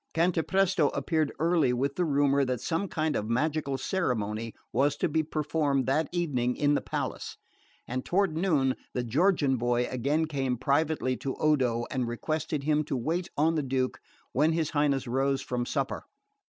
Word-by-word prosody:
Cantapresto 175 Hz, 0 st, +2 dB
appeared 155 Hz, +1 st, 0 dB
early 160 Hz, -5 st, +2 dB
with 135 Hz, +3 st, 0 dB
the 180 Hz, -, +1 dB
rumour 140 Hz, -2 st, +3 dB
that 125 Hz, -2 st, -1 dB
some 165 Hz, -, -1 dB
kind 155 Hz, -3 st, -1 dB
of 105 Hz, -, -2 dB
magical 140 Hz, +2 st, 0 dB
ceremony 115 Hz, -, -2 dB, 0.2 s
was 140 Hz, +4 st, +2 dB
to 145 Hz, -, 0 dB
be 160 Hz, 0 st, +1 dB
performed 150 Hz, -3 st, 0 dB
that 145 Hz, +4 st, +1 dB
evening 135 Hz, -9 st, 0 dB
in 145 Hz, 0 st, +2 dB
the -, -, +1 dB
palace; -, -, -4 dB, 0.5 s
and 130 Hz, +1 st, -3 dB
toward 190 Hz, -3 st, +1 dB
noon 155 Hz, -7 st, +2 dB, 0.2 s
the 125 Hz, -, 0 dB
Georgian 140 Hz, -, +2 dB
boy 120 Hz, +1 st, +1 dB
again 140 Hz, +6 st, +1 dB
came 135 Hz, -5 st, -1 dB
privately 145 Hz, -1 st, +1 dB
to 135 Hz, -, -4 dB
Odo 125 Hz, -6 st, +1 dB
and 125 Hz, -2 st, -1 dB
requested 150 Hz, +4 st, -2 dB
him 150 Hz, +1 st, +2 dB
to 135 Hz, -, -2 dB
wait 165 Hz, +9 st, -2 dB
on 160 Hz, +3 st, +3 dB
the 155 Hz, -, +1 dB
Duke 130 Hz, -1 st, -1 dB, 0.3 s
when 160 Hz, +2 st, +2 dB
his 160 Hz, -2 st, 0 dB
Highness 145 Hz, -3 st, +1 dB
rose 135 Hz, +2 st, 0 dB
from 120 Hz, -1 st, -2 dB
supper. -, -, -2 dB
145 Hz, 165 wpm, -28 LUFS, 130-160 Hz, 0.5 s, rumour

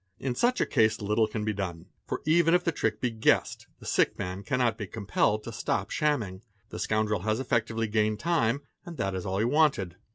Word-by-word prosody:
In 130 Hz, -2 st, -2 dB
such 245 Hz, -, +1 dB
a -, -, +3 dB
case 110 Hz, -1 st, +2 dB
little 105 Hz, +1 st, +1 dB
can 105 Hz, -1 st, -4 dB
be 110 Hz, -, 0 dB
done, 90 Hz, -4 st, -4 dB, 0.2 s
for -, -, -4 dB
even 165 Hz, +2 st, +4 dB
if 180 Hz, -, +2 dB
the 170 Hz, -, +1 dB
trick 110 Hz, -7 st, -1 dB
be 125 Hz, -, 0 dB
guessed, 110 Hz, -1 st, +1 dB
the -, -, -13 dB
sick -, -, +2 dB
man 90 Hz, +2 st, -4 dB
cannot 125 Hz, -1 st, +1 dB
be 105 Hz, -3 st, -6 dB
compelled 105 Hz, +1 st, 0 dB
to 115 Hz, -, -6 dB
stop 105 Hz, -3 st, -2 dB
shamming, 115 Hz, -12 st, 0 dB, 0.3 s
the -, -, -7 dB
scoundrel 110 Hz, -1 st, 0 dB
has 110 Hz, +3 st, 0 dB
effectively 115 Hz, -3 st, 0 dB
gained 105 Hz, 0 st, +1 dB
time 145 Hz, -6 st, +1 dB, 0.2 s
and 175 Hz, -3 st, -9 dB
that 95 Hz, -, -1 dB
is 95 Hz, +1 st, -4 dB
all 95 Hz, 0 st, -1 dB
he 110 Hz, -, +2 dB
wanted. 120 Hz, -, +2 dB
110 Hz, 215 wpm, -28 LUFS, 105-130 Hz, 0.3 s, even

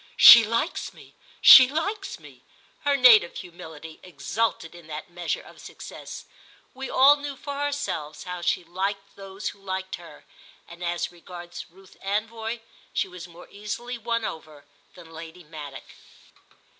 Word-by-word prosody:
"She 235 Hz, -, +11 dB
likes 230 Hz, +9 st, -2 dB
me—she 265 Hz, -, +6 dB
likes 390 Hz, +7 st, -3 dB
me": -, -, -16 dB, 0.4 s
her 285 Hz, -1 st, +3 dB
native 230 Hz, -9 st, +6 dB
humility 160 Hz, -2 st, -10 dB
exulted 185 Hz, -1 st, -3 dB
in 170 Hz, -2 st, -14 dB
that 155 Hz, +3 st, -8 dB
measure 175 Hz, -1 st, -3 dB
of -, -, -15 dB
success. -, -, -10 dB, 0.5 s
We 265 Hz, +1 st, -7 dB
all 280 Hz, +3 st, +6 dB
knew 285 Hz, -1 st, -6 dB
for 285 Hz, +1 st, -7 dB
ourselves 280 Hz, -, -4 dB
how 180 Hz, -1 st, -6 dB
she 175 Hz, +1 st, 0 dB
liked 195 Hz, +3 st, -4 dB
those 195 Hz, +1 st, -6 dB
who 200 Hz, -, -14 dB
liked 190 Hz, -1 st, -4 dB
her, 170 Hz, -4 st, -15 dB, 0.4 s
and 170 Hz, +1 st, -11 dB
as 175 Hz, 0 st, -2 dB
regards 175 Hz, 0 st, -10 dB
Ruth 190 Hz, +2 st, -20 dB
Anvoy 225 Hz, +3 st, -3 dB, 0.3 s
she -, -, 0 dB
was 180 Hz, -1 st, -10 dB
more 175 Hz, 0 st, -14 dB
easily 235 Hz, +4 st, -6 dB
won 230 Hz, 0 st, -2 dB
over 155 Hz, -2 st, -8 dB, 0.3 s
than 170 Hz, -2 st, -14 dB
Lady 165 Hz, +2 st, -11 dB
Maddock. 150 Hz, -3 st, -10 dB
190 Hz, 145 wpm, -25 LUFS, 170-230 Hz, 0.5 s, She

